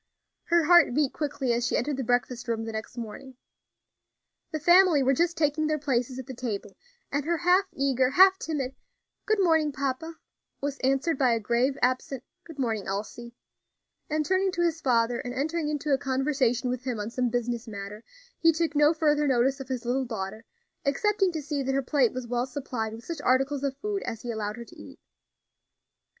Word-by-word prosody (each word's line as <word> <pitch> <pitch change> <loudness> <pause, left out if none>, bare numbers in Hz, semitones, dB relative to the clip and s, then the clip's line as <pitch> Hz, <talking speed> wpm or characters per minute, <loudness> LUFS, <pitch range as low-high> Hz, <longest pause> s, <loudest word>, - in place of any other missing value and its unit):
Her 340 -1 +3
heart 345 -6 +6
beat 295 -3 +1
quickly 285 -5 -1
as 240 +1 0
she - - +1
entered 285 +3 -1
the 265 - -3
breakfast 245 0 -1
room 225 -1 -1
the 225 - -4
next 220 +2 -6
morning. 240 +3 -8 1.2
The 310 - -2
family 345 -2 +5
were 265 +1 +3
just 340 +4 +1
taking 305 0 +1
their 310 0 +1
places 255 -3 -1
at 260 - -6
the 260 - -7
table, 220 -5 -5 0.4
and 285 0 0
her 340 +3 0
half 360 +3 +3
eager, 265 -2 +1
half 380 +6 +6
timid 275 -5 -3 0.5
"Good 435 - +3
morning, 320 -5 +3
papa," 280 +4 -3 0.4
was 280 0 -3
answered 270 +3 +1
by 255 -3 +4
a 230 - +1
grave, 240 +5 +1
absent 255 +1 0 0.2
"Good 325 -3 -11
morning, 225 -6 -2
Elsie," 215 +4 -5 0.7
and 305 0 0
turning 380 +2 +2
to 345 - 0
his 330 -2 0
father 235 -2 +2
and 245 0 -5
entering 310 +3 -1
into 295 -1 -1
a 270 - +2
conversation 260 -2 0
with 250 0 -4
him 250 -4 -3
on 210 +2 -4
some 250 0 0
business 240 -1 -2
matter, 205 +1 -7 0.4
he 330 - +5
took 325 -1 -1
no 295 +2 +5
further 300 -2 +2
notice 265 +1 +2
of 270 - -7
his 255 -2 -3
little 260 +2 0
daughter, 220 -1 -5 0.4
excepting 390 +7 +1
to 315 -2 -4
see 290 -1 -2
that 270 0 -1
her 275 - +1
plate 255 -3 +2
was 255 -1 -5
well 245 +1 -1
supplied 250 -5 -4
with 230 +1 -10
such 330 -4 -5
articles 270 +2 +1
of 270 -1 -2
food 410 +3 -3
as 225 - -5
he 240 - -3
allowed 215 -1 -4
her 235 - -8
to - - -16
eat. - - -13
270 Hz, 195 wpm, -27 LUFS, 240-305 Hz, 1.2 s, heart